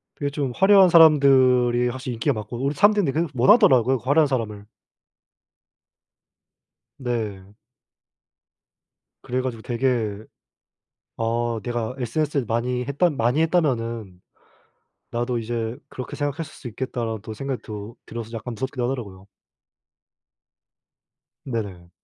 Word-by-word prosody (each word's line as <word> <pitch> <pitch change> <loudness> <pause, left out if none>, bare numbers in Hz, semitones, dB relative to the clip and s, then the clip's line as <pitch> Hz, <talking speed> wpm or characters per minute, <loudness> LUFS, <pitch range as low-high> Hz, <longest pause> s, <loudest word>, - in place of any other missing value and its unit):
그게 145 - -2
좀 140 -2 -2
화려한 195 -1 +6
사람들이 130 -7 +5
확실히 130 0 -5
인기가 115 - 0
많고 110 +2 -6
우리 140 +1 0
사람들이 205 +4 +4
근데 145 +2 0
계속 170 -4 -3
원하더라고요, 130 - +5
그 - - -21
화려한 145 +4 +3
사람을. 110 -6 -3 2.3
네. 105 -6 -4 1.7
그래 125 +1 -2
가지고 125 -3 -4
되게 115 -4 -1 0.9
아 115 0 -1
'내가 120 0 -3
SNS를 140 +2 -1
많이 125 +2 -1
했던 145 +3 +1
많이 120 +6 +2
했다면은 115 - -1 0.9
나도 120 +1 -1
이제 115 0 -3
그렇게 125 -2 -7
생각했을 145 +2 -2
수 125 - -9
있겠다.'라는 115 -2 -4
또 110 - -7
생각이 135 +2 -4
들 110 - -10 0.3
들어서 115 -1 -7
약간 115 +1 -6
무섭기도 130 +2 -3
하더라고요. 105 -7 -5 2.2
네네. 100 -8 -5
125 Hz, 285 characters per minute, -23 LUFS, 115-140 Hz, 2.3 s, 화려한